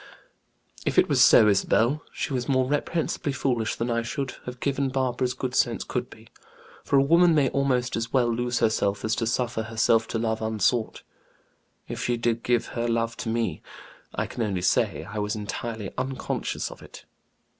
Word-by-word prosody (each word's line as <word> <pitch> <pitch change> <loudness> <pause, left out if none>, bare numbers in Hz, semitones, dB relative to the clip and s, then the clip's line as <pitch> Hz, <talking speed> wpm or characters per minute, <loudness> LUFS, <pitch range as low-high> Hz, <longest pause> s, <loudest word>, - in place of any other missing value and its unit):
"If - - -2
it - - +6
was - - +3
so, 110 - +7
Isabel, 115 +7 +2
she 140 - -3
was 125 0 -2
more 130 -1 +3
reprehensibly 145 +1 -1
foolish 120 -6 -1
than 120 +1 -2
I 115 0 +1
should 130 +3 -4
have 125 0 -6
given 140 0 0
Barbara's 130 -1 -1
good 130 -1 -4
sense - - +1
could - - -3
be; - - -15 0.6
for - - 0
a 135 - +5
woman 170 +3 +5
may 140 -3 +3
almost 130 -3 0
as 115 0 -3
well 120 -3 +2
lose 120 +1 -1
herself 100 -2 +1
as 110 - +1
to 115 - -1
suffer 120 -1 -1
herself 110 0 +2
to - - -2
love 110 -1 -1
unsought. 110 +1 0 0.8
If - - -5
she 120 -1 0
did 115 0 0
give 120 -1 0
her 120 0 -2
love 115 0 0
to 115 - -4
me, 115 -8 -1 0.5
I - - -1
can - - -6
only 100 -5 -1
say, 90 - +1
I 100 +5 -6
was 105 +1 -1
entirely 110 0 -5
unconscious 130 0 -3
of - - -12
it. - - -13
120 Hz, 185 wpm, -26 LUFS, 110-130 Hz, 0.8 s, so